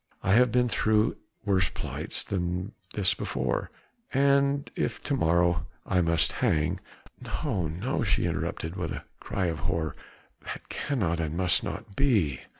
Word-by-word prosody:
I 95 - +3
have 125 +1 +6
been 125 +1 +3
through 110 -1 +2 0.3
worse 95 -2 +3
plights - - -3
than 90 0 -2 0.2
this 100 -3 +3
before, - - -2 0.4
and 140 +1 +3
if - - -1
to 145 - 0
morrow 85 -4 +2 0.2
I 90 -2 +2
must 85 -1 +3
hang...." 75 0 +1 0.4
"No, 100 - -1
no!" 95 - -1
she 95 -5 +2
interrupted 85 0 -2
with 90 -3 -2
a - - -6 0.2
cry 95 - -2
of 80 -3 -1
horror, 80 0 -1 0.5
"that - - -7
cannot 95 - -1
and 80 0 -2
must 90 -2 +3
not 100 -1 -6
be." 100 - +2
95 Hz, 150 wpm, -28 LUFS, 85-115 Hz, 0.5 s, have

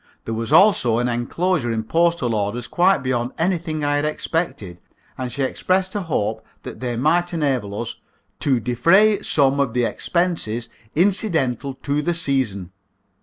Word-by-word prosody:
There 115 - -3
was 115 0 -3
also 175 - +5
an 120 +1 0
enclosure 125 +4 -1
in 110 -1 -2
postal 165 -2 +1
orders 110 +3 -2
quite 180 -5 +2
beyond 125 -1 -1
anything 165 -3 -1
I 145 0 +1
had 145 - 0
expected, 150 - -3 0.3
and 125 -1 -5
she 140 - -2
expressed 185 +7 0
a 205 - -2
hope 110 - -2 0.2
that - - -8
they 120 -2 -3
might 170 +6 +1
enable 130 -10 -1
us 115 - -5 0.4
"to 130 -4 +1
defray 170 - +3
some 140 -6 +2
of 130 -4 0
the 125 -1 +2
expenses 120 -8 -2 0.3
incidental 160 - +1
to 145 +1 0
the 170 +3 -1
season." 125 - -1
140 Hz, 155 wpm, -21 LUFS, 120-170 Hz, 0.4 s, also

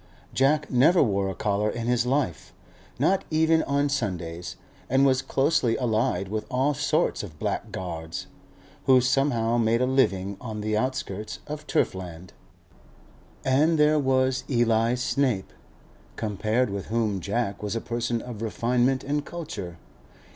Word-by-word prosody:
Jack 145 +3 +2
never 150 +8 +5
wore 100 -5 0
a 95 - -5
collar 105 +1 0
in 115 +2 -4
his 120 0 +1
life, 125 - -1 0.4
not 185 +9 +2
even 160 +1 +3
on 140 0 +1
Sundays, 90 -10 -3 0.3
and 135 +2 +4
was 130 -1 +3
closely 135 -2 +1
allied 110 -6 0
with 110 +2 -4
all 130 +3 +1
sorts 150 +4 0
of 85 -8 -9
blackguards, 80 0 -4 0.6
who 130 -1 +7
somehow 125 -3 +1
made 115 0 +2
a 125 - +2
living 100 -7 +1
on 110 -4 -5
the 110 0 -1
outskirts 110 -4 -3
of 150 0 -7
turf - - +1
land. 90 -1 -9 1.1
And 150 +5 +3
there 150 0 +4
was 130 -1 +1
Eli 115 -2 +2
Snape, 125 -5 0 0.6
compared 110 +2 0
with 100 -1 -4
whom 110 -3 0
Jack 100 +2 -2
was 105 +1 -3
a - - 0
person 120 0 -2
of 120 -4 -8
refinement 125 +3 +1
and 145 +1 -1
culture. 105 - -7
120 Hz, 140 wpm, -26 LUFS, 105-135 Hz, 1.1 s, who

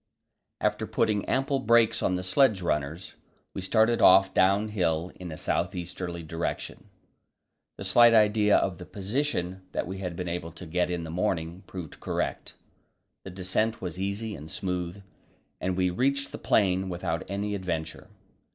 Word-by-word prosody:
After - - 0
putting 105 -2 +1
ample 135 +1 +1
brakes 115 -2 +3
on 90 - +1
the 90 - -3
sledge 100 0 +3
runners, 75 +3 -2 0.4
we - - -4
started 110 +4 +3
off 95 +1 +7
downhill 95 -4 +2
in 90 -2 -6
a 80 - -7
south 90 +3 -1
easterly 85 -1 -5
direction. 80 +2 -4 0.9
The - - -6
slight 115 +4 +6
idea 105 -1 +5
of 90 -4 -1
the - - -9
position 100 -3 -2
that - - -1
we 95 +2 -6
had 90 -3 -4
been 90 +1 -4
able 85 -1 -4
to 90 - -10
get 90 +2 0
in 90 -1 -2
the 80 - -6
morning 85 -1 -2
proved 90 -5 -8
correct. - - -3 0.7
The - - -6
descent 95 +4 -1
was 90 -1 -5
easy 100 +3 -2
and 75 +2 -10
smooth, 90 +3 -4 0.6
and 90 0 -2
we 90 -1 +2
reached 140 +8 0
the - - -7
plain 95 -2 +2
without 85 -2 -2
any 100 +1 -2
adventure. 85 -5 -4
95 Hz, 160 wpm, -27 LUFS, 85-105 Hz, 0.9 s, off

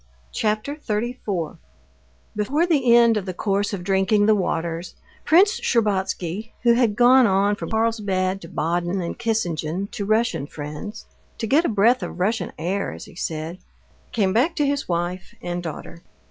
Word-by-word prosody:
Chapter 215 +6 -1
34 215 - -3 0.8
Before 275 +11 +1
the 270 -9 +4
end 235 -2 +5
of 200 -2 -4
the 185 - -4
course 200 +1 0
of 195 -4 -4
drinking 195 +2 +2
the 215 - +5
waters, 170 -3 -2 0.3
Prince 395 +8 +4
Shtcherbatsky, 205 -2 -1
who 235 -1 +6
had 235 -3 +2
gone 245 +2 +6
on 200 +1 +2
from - - -6
Carlsbad 200 -4 0
to 165 - -9
Baden 175 +4 -1
and 175 +5 -4
Kissingen 195 -5 -2
to 240 -4 -4
Russian 215 -8 +1
friends—to 155 +10 -8
get 290 +10 +3
a - - +1
breath 230 +4 +3
of - - -6
Russian 215 +5 0
air, 185 +5 -2
as - - -9
he - - -15
said—came 175 +4 -4
back 275 - +2
to 295 - +1
his 285 -4 -1
wife 175 +2 -3
and 175 0 -4
daughter. 170 0 -7
205 Hz, 155 wpm, -23 LUFS, 180-235 Hz, 0.8 s, who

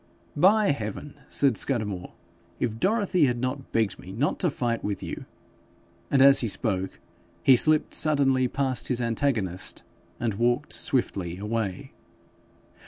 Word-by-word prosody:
'By 200 +6 +4
heaven,' 140 +4 -6
said 135 -6 +2
Scudamore, 105 -9 -2 0.5
'if 115 -2 -2
Dorothy 195 - +2
had 120 -1 -1
not 130 +2 -4
begged 110 -5 0
me 95 - -10
not 125 +10 -1
to 180 - +2
fight 120 -4 -2
with 100 -1 -3
you - - -6 0.4
,' 85 0 -33
and 135 -1 +4
as 140 0 +7
he 120 - -1
spoke 95 -3 -2 0.4
he 135 - +7
slipped 155 +5 +2
suddenly 135 -4 +3
past 130 -1 -2
his 125 -2 -1
antagonist, 115 -7 -1 0.4
and 115 -3 -1
walked 120 +4 0
swiftly 85 -2 -1
away. 105 -2 -3
120 Hz, 140 wpm, -26 LUFS, 105-140 Hz, 0.5 s, as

